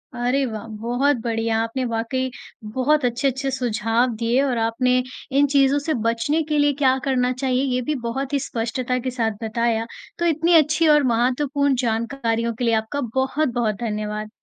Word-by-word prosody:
अरे, 250 +3 +1
वाह! 220 -3 -5 0.2
बहुत 250 +4 +1
बढ़िया, 225 -1 0
आपने 230 +3 -3
वाक़ई 245 +3 -1 0.4
बहुत 270 +3 +2
अच्छे-अच्छे 265 +3 0
सुझाव 235 -1 0
दिए 235 +4 +1
और 260 -4 0
आपने 250 +3 +1 0.5
इन 285 0 +5
चीज़ों 275 0 +4
से 315 - +1
बचने 230 +8 +1
के 300 - +2
लिए 290 0 +3
क्या 260 0 +4
करना 250 -2 +2
चाहिए 260 -1 +1
ये 250 - 0
भी 305 - +1
बहुत 265 +4 -3
ही 280 - +2
स्पष्टता 250 +1 -2
के - - -1
साथ 230 -3 0
बताया, 225 0 0 0.3
तो 345 - 0
इतनी 330 +1 +2
अच्छी 310 +1 +4
और 295 -1 +5
महत्वपूर्ण 275 +4 +1
जानकारियों 230 0 -1
के 245 - -2
लिए 230 - +2
आपका 285 +6 -4
बहुत-बहुत 260 -5 0
धन्यवाद। 215 -1 -3
250 Hz, 165 wpm, -22 LUFS, 230-275 Hz, 0.5 s, इन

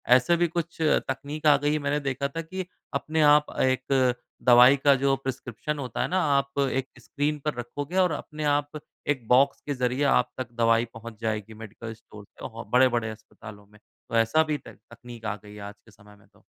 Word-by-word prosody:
ऐसे 130 +7 +3
भी 175 0 +2
कुछ 170 0 -4
तकनीक 150 0 -1
आ 145 - +8
गई 145 +1 0
है 155 - 0
मैंने 145 +1 0
देखा 135 +1 -1
था 165 +4 -5
कि 185 +3 -6 0.3
अपने 155 +3 -1
आप 150 0 +4
एक 130 -1 +2 0.3
दवाई 125 +2 +8
का 140 -1 +6
जो 135 0 +3
प्रिस्क्रिप्शन 135 +2 -5
होता 125 -5 -4
है - - 0
ना 185 +1 +1 0.2
आप 140 0 -2
एक 135 0 -1
स्क्रीन 150 +1 -2
पर 150 - 0
रखोगे 145 +8 -5
और 180 -3 +4
अपने 150 +1 -5
आप 145 +1 -2 0.3
एक 130 -6 -1
बॉक्स 135 +3 +4
के 145 - -2
ज़रिए 125 +2 -1
आप 125 0 0
तक 130 -2 -5
दवाई 115 +1 +4
पहुँचा 115 -1 -10
जाएगी 110 -1 -3
मेडिकल 110 +1 -8
स्टोर 105 -2 -14
से। 115 +2 -9
बड़े-बड़े 120 -3 +3
अस्पतालों 105 -1 -12
में 105 0 -21 0.3
तो - - -3
ऐसा 115 +8 +3
भी 155 -1 -2
तै - - -13
तकनीक 120 -1 -13
आ 105 -1 -1
गई 105 0 -12
है 105 - -10
आज 100 0 -9
के 110 - -21
समय 105 0 -18
में 100 - -24
तो। - - -27
130 Hz, 205 wpm, -26 LUFS, 115-145 Hz, 0.3 s, आ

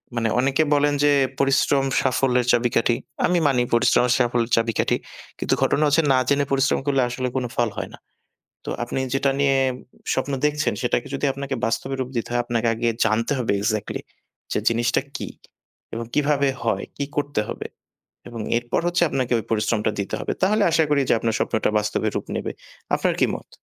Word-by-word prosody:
মানে 115 -1 +1
অনেকে 135 +4 +2
বলেন 145 0 +3
যে 145 - +5 0.3
পরিশ্রম 135 0 +3 0.2
সাফল্যের 125 -1 +2
চাবিকাঠি। 120 -1 +2 0.3
আমি 180 - +2
মানি 130 -3 +2
পরিশ্রম 120 +1 +4
সাফল্যের 120 -1 0
চাবিকাঠি। 115 -1 +1 0.4
কিন্তু - - 0
ঘটনা 150 - +2
হচ্ছে 150 +3 +4
না - - +4
জেনে 140 0 +2
পরিশ্রম 135 0 +2
করলে 135 -2 +3
আসলে 125 +1 -2
কোন 130 - 0
ফল 120 -1 +1
হয় - - -4
না। - - -11 0.7
তো - - -4
আপনি 120 +2 -3
যেটা 135 0 +2
নিয়ে 140 -1 +3 0.6
স্বপ্ন 130 +2 -1
দেখছেন 150 0 +1
সেটাকে 125 +1 0
যদি 135 - -1
আপনাকে 140 0 -4
বাস্তবে 125 +4 -2
রূপ 125 - -2
দিতে 115 - -3
হয়, 120 0 +2
আপনাকে 120 -1 0
আগে 115 +1 -2 0.2
জানতে 115 +3 +1
হবে 120 - 0
এক্সাক্টলি 110 0 -2 0.5
যে - - +1
জিনিসটা 120 +2 +1
কী - - -4 0.7
এবং 115 +1 -4
কীভাবে 145 -1 +2 0.2
হয়, 100 -4 0
কী 140 - -1
করতে 145 -6 0
হবে? - - -5 0.6
এবং 115 -1 -7 0.2
এরপর 120 +5 -2
হচ্ছে 175 0 +1
আপনাকে 130 -2 -1
ওই - - -5
পরিশ্রমটা 110 0 +1
দিতে 100 - -4
হবে। - - -2
তাহলে 210 +3 +3
আশা 160 0 +3
করি 145 -1 +3 0.2
আপনার 115 0 -1
স্বপ্নটা 110 - 0
বাস্তবে 105 0 -1
রূপ - - -3
নেবে। - - -3 0.4
আপনার - - +1
কি - - +5
মত? - - -15
125 Hz, 180 wpm, -23 LUFS, 115-140 Hz, 0.7 s, যে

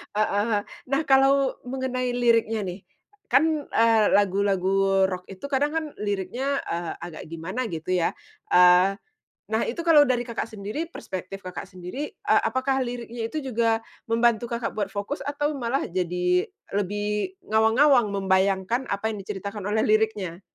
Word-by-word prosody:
heeh, 210 +1 +1 0.3
nah 275 +3 +1
kalau 270 0 +4
mengenai 255 -1 -2
liriknya 230 -3 +2
nih, 180 +1 -5 0.5
kan, 310 -1 +2
eee 225 -2 +4
lagu-lagu 195 -1 +2
rock 180 0 -4
itu 195 +4 -12
kadang 290 +2 +2
kan 320 -1 0
liriknya, 210 +7 -2
eee, 170 0 -3
agak 170 -3 -7
gimana 185 +10 -4
gitu 165 0 -5
ya, 175 -2 +2 0.4
eee, 180 +2 +6 0.6
nah 220 - +2
itu 295 - -3
kalau 315 -3 +7
dari 245 -1 +1
Kakak 230 -1 -4
sendiri 215 +11 -5
perspektif 190 - -7
Kakak 185 +1 -6
sendiri, 185 +11 -6
eee, - - +1
apakah 265 +1 0
liriknya 240 -2 -4
itu 310 - -3 0.2
juga 225 -1 +2 0.3
membantu 235 0 +2
Kakak 235 0 -3
buat 205 -2 -1
fokus 205 +8 -4
atau 290 +1 -2
malah 260 0 -1
jadi 180 0 0 0.3
lebih 210 - -2
ngawang-ngawang 225 +3 +4
membayangkan 195 +4 +1
apa 200 +2 -1
yang 200 - -7
diceritakan 200 +1 -6
oleh 220 +1 +2
liriknya? 215 -5 0
215 Hz, 145 wpm, -25 LUFS, 190-255 Hz, 0.6 s, kalau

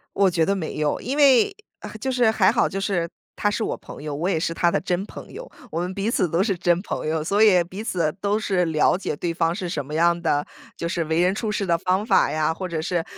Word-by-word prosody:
我 195 -1 +4
觉 165 -2 +1
得 195 - +2
没 180 -5 -4
有。 150 -1 0
因 265 +4 -3
为 285 - +5 0.3
啊， - - -8
就 265 - -1
是 245 -3 +3
还 205 -4 +4
好， - - +2
就 195 - -4
是 180 -4 -1 0.3
他 205 - +1
是 220 - -2
我 - - -2
朋 - - -11
友， 150 -1 -4
我 165 +6 -2
也 190 - +1
是 165 +1 -2
他 175 0 +2
的 - - 0
真 180 +2 -1
朋 - - -11
友。 - - -9 0.2
我 165 - -1
们 180 +1 -3
彼 200 +3 -2
此 180 - +1
都 165 +3 +1
是 200 -2 0
真 175 0 +1
朋 - - -4
友， 160 0 0
所 200 +7 +2
以 185 -5 +6
彼 185 +5 -7
此 170 -8 -1
都 205 +1 +1
是 190 -4 0
了 155 0 +2
解 185 - -3
对 170 +2 -3
方 165 0 +1
是 180 -1 -4
什 150 -5 -3
么 150 +3 -7
样 170 +2 +3
的 145 -3 +1 0.3
就 170 - -3
是 170 -1 -1
为 160 +1 0
人 180 +2 +3
处 215 +1 -2
事 210 -2 -1
的 170 -2 +3
方 185 +4 0
法 - - +3
呀， 155 +1 0
或 185 +2 -5
者 165 -2 -3
是， 170 +1 -1
180 Hz, 290 characters per minute, -23 LUFS, 165-200 Hz, 0.3 s, 以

